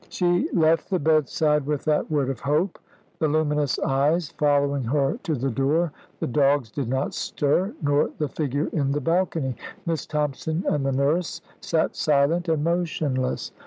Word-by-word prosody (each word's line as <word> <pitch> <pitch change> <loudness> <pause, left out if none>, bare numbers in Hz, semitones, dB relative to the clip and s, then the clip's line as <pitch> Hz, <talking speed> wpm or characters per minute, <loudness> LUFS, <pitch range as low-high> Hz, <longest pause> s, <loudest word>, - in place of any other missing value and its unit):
She 175 -1 +1
left 165 -1 +2
the 190 - +1
bedside 150 -1 +2
with 150 -2 -2
that 150 -1 +1
word 140 -4 +1
of 130 - -7
hope, 155 +7 0 0.4
the 155 - +2
luminous 150 -2 +1
eyes 150 +5 +1
following 145 -3 +1
her 140 - 0
to 165 -5 -1
the 135 +1 -1
door. 145 +7 +1 0.3
The - - -1
dogs 140 -3 +2
did 130 -1 -3
not 130 +2 -1
stir, 175 +8 0
nor 145 0 +2
the 150 - -1
figure 145 +1 -2
in 140 -3 0
the 145 - 0
balcony. 165 -4 0 0.3
Miss 165 -4 -2
Thompson 150 +3 -2
and 145 -2 +1
the 135 - 0
nurse 145 +6 0 0.2
sat 160 -1 0
silent 155 +4 +2
and 155 -2 +1
motionless. 155 -6 -1
150 Hz, 160 wpm, -24 LUFS, 140-160 Hz, 0.4 s, left